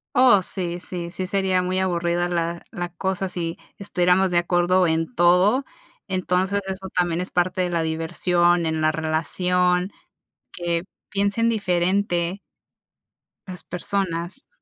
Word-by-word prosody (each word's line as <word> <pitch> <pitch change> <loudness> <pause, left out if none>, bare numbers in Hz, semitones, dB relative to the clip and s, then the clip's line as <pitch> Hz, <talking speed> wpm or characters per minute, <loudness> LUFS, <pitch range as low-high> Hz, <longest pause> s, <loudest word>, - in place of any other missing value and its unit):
Oh, 245 -6 +6
sí, 175 -2 -3
sí, 175 -1 -6
sí 185 +1 -4
sería 190 -1 +1
muy 185 +1 -1
aburrida 175 -1 0
la 170 0 -2
la 175 0 -4
cosa 190 +2 -2
si 170 -2 -4 0.2
estuviéramos 185 -1 +2
de 175 - +2
acuerdo 175 +1 +2
en 165 +6 -1
todo. 185 +7 +4 0.4
Entonces 185 +1 0
eso 190 0 -5
también 175 -1 0
es 180 - -4
parte 180 +1 +1
de 180 - 0
la 170 -2 0
diversión 175 +2 +1
en 160 0 -1
la 155 0 +3
relación, 180 +4 +1 0.6
que 170 -1 -2 0.3
piensen 200 +3 +1
diferente 185 -3 0 1.1
las 180 -2 -7
personas. 180 +3 -3
180 Hz, 130 wpm, -23 LUFS, 170-190 Hz, 1.1 s, Oh